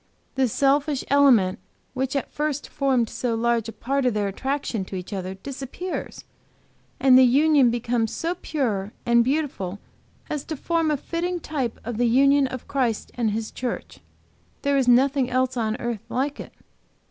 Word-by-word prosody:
The 265 -1 +2
selfish 280 +3 +1
element 250 -10 +5 0.3
which 265 +1 -2
at 275 - -2
first 295 -1 -2
formed 260 -4 +1
so 235 +1 -2
large 230 -1 0
a - - -5
part 275 +4 -2
of 240 - 0
their 205 -1 0
attraction 260 0 -2
to 190 - -7
each 185 +2 -6
other 190 -1 -4
disappears, 275 - -6 0.8
and 260 -1 +6
the - - +8
union 280 +1 +5
becomes 235 -1 -1
so 335 +1 -2
pure 215 -9 -2
and 235 0 +4
beautiful 260 - -2 0.5
as 295 -2 -3
to 315 - -5
form 330 +2 0
a 300 - +1
fitting 350 +5 -3
type 275 -8 -3
of 230 0 -4
the 245 - +3
union 275 +3 +4
of 255 -1 -7
Christ 250 -6 -1
and 235 -3 0
His 220 +1 -3
church. 245 -2 -5 0.6
There 280 -1 +2
is 265 -2 +2
nothing 260 +1 +4
else 255 0 0
on 220 -1 -1
earth 235 -4 -3
like 275 +3 -2
it." - - -8
255 Hz, 170 wpm, -24 LUFS, 230-280 Hz, 0.8 s, the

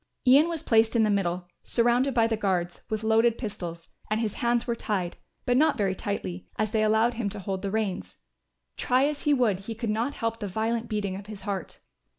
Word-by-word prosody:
Ian 280 +6 +6
was 330 -3 -3
placed 225 0 +3
in 230 - +4
the 215 - +3
middle, 180 -3 0 0.2
surrounded 240 +3 +2
by 230 -2 +5
the 225 0 +1
guards, 185 -4 -1
with 215 0 -2
loaded 225 +1 +3
pistols, 175 -7 -6 0.2
and 215 +1 +1
his 220 -3 -1
hands 240 -1 +1
were 235 - -1
tied, 190 -6 -2 0.3
but 245 -1 +2
not 300 -1 +3
very 195 -3 +1
tightly, 90 - -4
as 215 -1 0
they 220 - +1
allowed 220 +2 +3
him 230 -3 -2
to 210 - -7
hold 190 0 -3
the 200 - -2
reins. 205 -3 -2 0.6
Try 255 +2 +3
as 295 0 -2
he 295 - +3
would 225 -8 +2
he 225 +3 -6
could 225 -1 -2
not 235 +6 -1
help 230 -1 -2
the 205 - -3
violent 225 +4 -1
beating 205 -3 -2
of 200 +1 -8
his 210 -2 -8
heart. 195 -4 -5
220 Hz, 215 wpm, -27 LUFS, 195-235 Hz, 0.6 s, Ian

